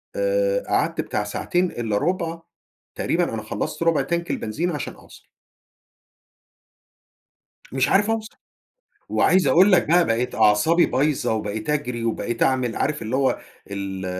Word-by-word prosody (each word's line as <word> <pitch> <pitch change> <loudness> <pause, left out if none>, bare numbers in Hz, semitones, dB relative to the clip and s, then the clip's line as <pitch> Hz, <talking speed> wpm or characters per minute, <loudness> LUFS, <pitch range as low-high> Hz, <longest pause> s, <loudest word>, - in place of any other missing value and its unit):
آآ - - +1
قعدت - - 0
بتاع - - -2
ساعتين 180 -1 -1
إلا 110 -3 -2
ربع، 170 - -1 0.6
تقريبًا - - 0
أنا - - -3
خلصت - - -4
ربع 165 -2 +3
تانك 170 0 -2
البنزين 160 +12 -2
عشان 150 -5 -4
أوصل. - - -17 2.5
مش 130 0 +1
عارف 205 +2 +3
أوصل، 225 0 -3 0.7
وعايز 185 -3 +3
أقول 180 +9 +5
لك 175 -4 +4
بقى 175 +1 +4
بقيت 115 +2 -1
أعصابي 105 +12 +4
بايظة، 140 -3 0
وبقيت 110 +2 -3
أجري، 125 -6 -2
وبقيت 115 +1 -2
أعمل 130 -3 +1
عارف 150 -2 -1
اللي 115 +4 -2
هو 135 -1 +1 0.3
ال 95 -1 -5
150 Hz, 135 wpm, -23 LUFS, 115-180 Hz, 2.5 s, أقول